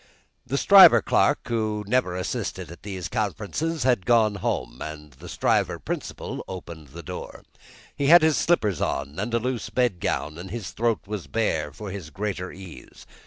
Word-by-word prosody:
The 140 - -1
Stryver 185 - +8
clerk, - - +2
who 110 -2 -1
never 105 -4 +1
assisted 90 -3 -4
at 85 - -12
these 95 -4 -5
conferences, 110 - -2
had 125 -8 +1
gone 115 -3 +4
home, 95 - -3
and 75 -1 -7
the 80 +7 -12
Stryver - - +1
principal - - -5
opened 85 -5 -8
the 85 +5 -10
door. - - -8 0.5
He 140 -1 -1
had 170 +2 +8
his 160 -2 +4
slippers 110 - +1
on, 70 +5 -2
and 110 +4 -2
a 115 - +2
loose 125 0 -3
bed 120 -8 0
gown, 75 0 -2
and 95 +2 -8
his 115 +1 -5
throat 115 -1 0
was 100 -7 -5
bare 80 -7 -1
for 105 -3 -8
his 95 -6 -7
greater 95 -1 -4
ease. 95 -3 -12
105 Hz, 170 wpm, -25 LUFS, 85-120 Hz, 0.5 s, Stryver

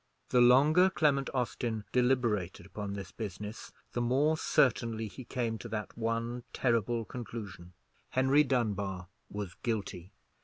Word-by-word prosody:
The 125 - +4
longer 145 +9 +6
Clement 145 -6 +2
Austin 120 -4 -2
deliberated 120 -9 +1
upon 100 0 -5
this 100 -1 -7
business 105 0 -6 0.2
the 120 - -1
more 135 +6 +3
certainly 115 -7 +1
he 130 +5 -9
came 115 -3 -2
to 120 - -8
that 105 -1 -4
one 115 +1 -2
terrible 115 -1 +1
conclusion: 105 -8 -8 0.4
Henry 135 +3 +4
Dunbar 100 -9 -1 0.2
was 100 -3 -5
guilty. 100 -6 -3
115 Hz, 125 wpm, -31 LUFS, 105-125 Hz, 0.4 s, longer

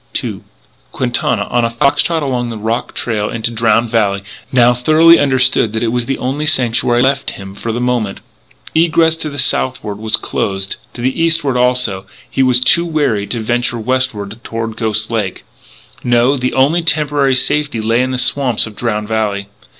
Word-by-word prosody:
II - - -5 0.5
Quintana, - - -1
on 120 - +1
a 115 - +1
fox 115 +4 +2
trot 165 -2 -1
along 125 -3 -2
the 115 - -6
rock 110 +3 -3
trail 105 -3 -2
into 115 0 -1
Drowned 115 0 +1
Valley, 100 -4 0 0.3
now 125 -1 +4
thoroughly 155 +7 +5
understood 130 -5 +2
that 110 +1 -2
it 115 - +1
was 120 -1 -1
the 135 - -1
only 140 +4 -2
sanctuary 120 -3 +2
left 135 +1 0
him 95 -1 -9
for 115 +3 -5
the 115 - -3
moment. 120 -5 -1 0.5
Egress 165 0 +3
to 155 - -3
the 145 - -9
southward 100 - 0
was 110 0 +1
closed; 95 -1 -3 0.2
to 120 - -7
the 130 +6 -1
eastward, 160 -5 +2
also; 125 -5 +1
and 95 - -21 0.2
he 135 - 0
was 130 -2 +3
too 170 +6 +4
wary 145 -11 -1
to 115 - -3
venture 120 +1 -1
westward 115 -3 -2
toward 115 -1 -5
Ghost 110 -1 -1
Lake. 105 -5 -3 0.6
No, 120 +3 +2
the 130 -1 -2
only 145 +6 +2
temporary 145 -4 +2
safety 150 -1 0
lay 115 +2 +1
in 130 - -1
the 130 - -2
swamps 125 -1 +3
of 110 -2 -9
Drowned 105 -2 -2
Valley. 105 -2 -2
120 Hz, 180 wpm, -15 LUFS, 110-135 Hz, 0.6 s, thoroughly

